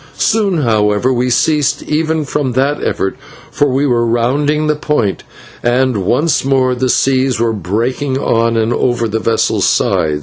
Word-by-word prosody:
Soon, 200 -7 +1
however, 110 +2 +1
we 125 +1 0
ceased 145 +3 +1
even 155 0 -1
from 135 -2 -2
that 140 +4 0
effort, 95 - -2 0.4
for 145 - +1
we 135 +2 0
were 120 -3 +1
rounding 140 +6 0
the 150 0 +1
point 150 -9 -1 0.4
and 125 +1 +1
once 125 - 0
more 130 -1 +1
the 130 +1 -1
seas 130 -1 +1
were 115 -1 +1
breaking 115 - -2
on 115 -3 0
and 115 +1 +1
over 120 -2 0
the 110 +1 -2
vessel's 115 0 0
side. 75 -2 0
130 Hz, 160 wpm, -14 LUFS, 115-145 Hz, 0.4 s, Soon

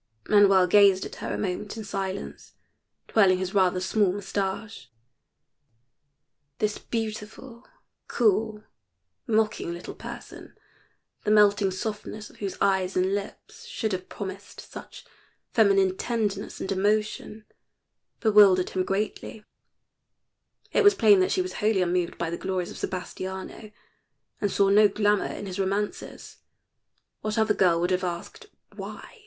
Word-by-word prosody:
Manuel 195 -3 +5
gazed 195 0 +5
at - - -9
her - - -5
a - - -2
moment 200 +3 -4
in 220 - -5
silence, 195 -1 -5 0.5
twirling 195 -4 +4
his 185 0 -4
rather 185 -2 +3
small 190 +1 +1
mustacha. 200 +2 -4 1.7
This 210 +3 -1
beautiful, 225 +2 -6 0.4
cool, 215 -1 +1 0.6
mocking 215 -5 0
little 170 +1 -7
person, - - -10 0.7
the - - -1
melting 205 -1 +4
softness 210 +2 -6
of - - -21
whose 200 -2 -5
eyes 190 -2 +1
and 185 +1 +1
lips 200 0 -7
should 220 -2 -3
have 185 -1 -4
promised 195 0 -8
such - - -11 0.5
feminine 195 -4 +4
tenderness 210 -3 -3
and - - -4
emotion, 210 +2 -1 0.8
bewildered 205 -5 +5
him 185 - 0
greatly; 210 +2 -3 1.3
it 465 - +3
was 410 0 +6
plain 210 -3 +6
that 185 - +2
she 185 - +1
was 185 0 -6
wholly 210 -3 +2
unmoved 175 -1 -1
by 165 -1 -3
the 170 - -3
glories 185 -2 -2
of - - -10
Sebastiano, 190 +3 -6 0.7
and 205 - +1
saw 200 -1 +3
no 210 +1 +6
glamour 205 0 +1
in - - -7
his 190 0 -6
romances. 200 +2 -3 0.8
What 215 +1 -3
other 220 -1 +3
girl 175 -4 +3
would 175 +2 0
have 185 0 0
asked 185 - -6 0.3
"Why?" - - -9
200 Hz, 135 wpm, -26 LUFS, 185-215 Hz, 1.7 s, was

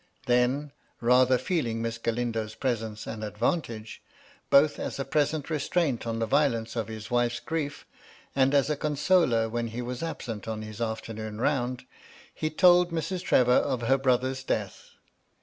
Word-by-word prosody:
Then 125 +4 +1 0.3
(rather 125 +1 +4
feeling 125 -5 -1
Miss 115 0 -3
Galindo's 115 -2 -2
presence 110 -4 -3
an 110 -1 -6
advantage, 110 +1 -2 0.5
both 145 +1 +5
as - - -4
a 135 - -3
present 145 +1 0
restraint 150 -4 0
on 115 0 -2
the 115 - 0
violence 120 -4 +1
of 115 -3 -2
his 110 0 -8
wife's 120 0 +1
grief, 145 +1 -4 0.5
and 135 +1 +3
as 140 +1 +3
a - - +1
consoler 145 -5 +2
when 115 +1 -2
he 115 +2 -5
was 125 0 -5
absent 120 -11 -5
on 110 -1 -4
his 110 +1 -8
afternoon 110 -1 -4
round), 125 -2 0 0.5
he 155 - -2
told 175 +2 +5
Mrs. 165 +3 -2
Trevor 125 -8 +3
of 130 -1 +2
her 135 +3 +3
^brother's 130 0 +1
death. 105 -6 -3
125 Hz, 155 wpm, -27 LUFS, 115-145 Hz, 0.5 s, both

